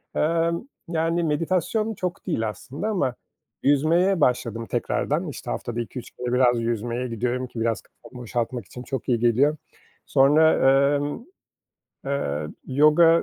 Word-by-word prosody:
Emm, 165 +2 +1 0.2
yani, 165 +1 0
meditasyon 185 +8 0
çok 180 -3 -4
değil 115 - 0
aslında 140 - -6
ama 135 - 0 0.5
yüzmeye 165 +6 +3
başladım 115 -3 +1
tekrardan. 150 +8 -1
İşte 145 - -6
haftada 120 -1 -3
2-3 120 +1 -8
kere 125 0 -4
biraz 125 -2 +3
yüzmeye 120 +2 -2
gidiyorum 125 +2 -2
ki 120 - -8
biraz 115 -2 0
kafamı 125 -1 -14
boşaltmak 120 -1 -3
için 125 +7 -10
çok 135 -1 -5
iyi 120 -2 +2
geliyor. 125 +6 +3 0.5
Sonra, 150 +4 +5 0.4
emm, 145 +10 -4 0.8
eee, 75 - -2 0.2
yoga 155 +5 +5
135 Hz, 130 wpm, -24 LUFS, 120-165 Hz, 0.8 s, Sonra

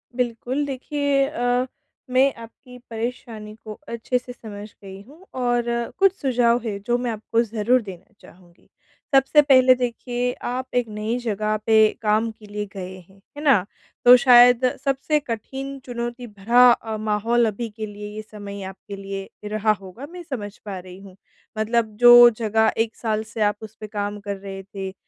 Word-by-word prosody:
बिल्कुल। 250 +3 -2
देखिए, 280 0 0
अ, 245 +1 0 0.4
मैं 260 +2 +3
आपकी 230 +2 -13
परेशानी 225 -2 -6
को 215 - -6
अच्छे 235 +2 -2
से 245 0 -10
समझ 210 -3 -10
गई 195 0 -10
हूँ 300 - -18
और 245 -2 0 0.3
कुछ 390 -1 +5
सुझाव 245 -4 +1
है, 210 -3 -3
जो 240 +4 0
मैं 245 -1 -2
आपको 225 +1 -1
ज़रूर 230 +3 +1
देना 190 0 -11
चाहूँगी। 175 -1 -20 0.5
सबसे 270 +3 +5
पहले 260 -3 +6
देखिए 245 0 -2 0.2
आप 255 +1 -3
एक 245 -2 +1
नई 215 +2 -3
जगह 215 -2 -1
पे 220 -1 +4 0.2
काम 215 +1 +1
के 215 -1 -17
लिए 210 0 -5
गए 185 -1 -7
हैं, 190 +2 -21 0.2
है 295 - -6
ना? 265 -11 +4 0.4
तो 245 +1 +10
शायद 245 0 +6 0.2
सबसे 275 +2 +1
कठिन 270 +2 -6
चुनौती 240 0 -5
भरा 235 +4 +4
अ, 225 -2 -2
माहौल 220 +3 +1
अभी 225 +2 -4
के 215 +1 -6
लिए 210 0 -8
ये 215 - -5
समय 205 -2 -9
आपके 190 +2 -9
लिए 195 0 -7 0.2
रहा 215 +1 +1
होगा, 195 +8 -10
मैं 355 0 -9
समझ 215 -10 -6
पा 200 -2 -5
रही 180 +1 -12
हूँ। 195 -1 -14 0.4
मतलब 220 0 0
जो 240 0 +9
जगह 220 -1 +1
1 225 0 0
साल 220 -2 -2
से 225 - -4
आप 205 -1 +2
उस 220 0 -10
पे 215 - -7
काम 205 0 -4
कर 200 -1 -5
रहे 195 0 -8
थे, 190 -1 -7
225 Hz, 170 wpm, -22 LUFS, 210-245 Hz, 0.5 s, तो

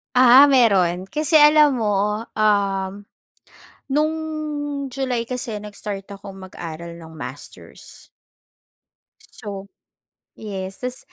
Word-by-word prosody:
Ah, 255 +3 +8
meron, 190 -8 +3
kasi 305 - +2
alam 295 -3 +6
mo, 210 +1 0
um, 200 -2 0 0.9
nung 305 +2 +2 0.7
July 250 -3 -3
kasi, 245 -4 -4
nag-start 205 -1 -7
akong 200 -1 -10
mag-aral 170 -2 -8
ng 165 -1 -12
masters. 160 - -11 1.2
So, 200 -2 -9 0.7
yes. 195 -3 -6
Tas 250 0 -4
210 Hz, 90 wpm, -21 LUFS, 195-250 Hz, 1.2 s, Ah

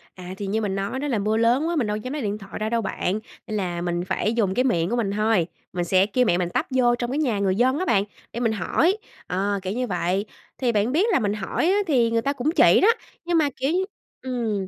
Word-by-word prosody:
À, 180 0 -8
thì 200 - -4
như 220 +3 0
mình 200 -3 -1
nói 195 +7 -2
đó, 295 - -2
là 245 - 0
mưa 215 +2 +1
lớn 240 +7 +3
quá, 340 - -1
mình 250 -9 +1
đâu 210 0 -1
dám 255 +6 -5
lấy 300 - -3
điện 210 -1 -2
thoại 195 -2 -9
ra 215 0 -1
đâu 230 0 +1
bạn, 195 0 -2 0.3
nên 215 - -2
là 175 -3 -2
mình 175 0 -1
phải 205 +3 0
dùng 205 -5 +1
cái 255 - +2
miệng 175 -8 +1
của 240 - 0
mình 220 -5 0
thôi, 210 -4 +2 0.3
mình 175 -1 -1
sẽ 185 +2 +4
kêu 250 +4 +1
mẹ 175 -6 +3
mình 175 -1 -1
tấp - - +1
vô 240 -2 +4
trong 240 0 -3
cái 280 - -1
nhà 245 -9 +1
người 190 -1 +1
dân 260 +5 +2
á 370 - -1
bạn, 200 - +3 0.3
để 235 - -3
mình 230 -2 +1
hỏi, 325 - +1 0.3
ờ, 200 +2 -1
kiểu 185 +1 -3
như 250 +2 -2
vậy. 185 +1 -1 0.3
Thì 250 -3 +1
bạn 215 +2 +1
biết 335 +9 +3
là 375 - +3
mình 205 -2 0
hỏi 210 +8 -2
á, 395 - +3
thì 240 -7 +3
người 230 0 +2
ta 280 +4 0
cũng 275 +3 -1
chỉ - - +6
đó, 400 - +5 0.4
nhưng 345 -1 +2
mà, 300 -3 +3
kiểu 270 +3 -1
như 370 +2 +1 0.4
ừm, 225 -7 -2
220 Hz, 280 wpm, -24 LUFS, 195-255 Hz, 0.4 s, chỉ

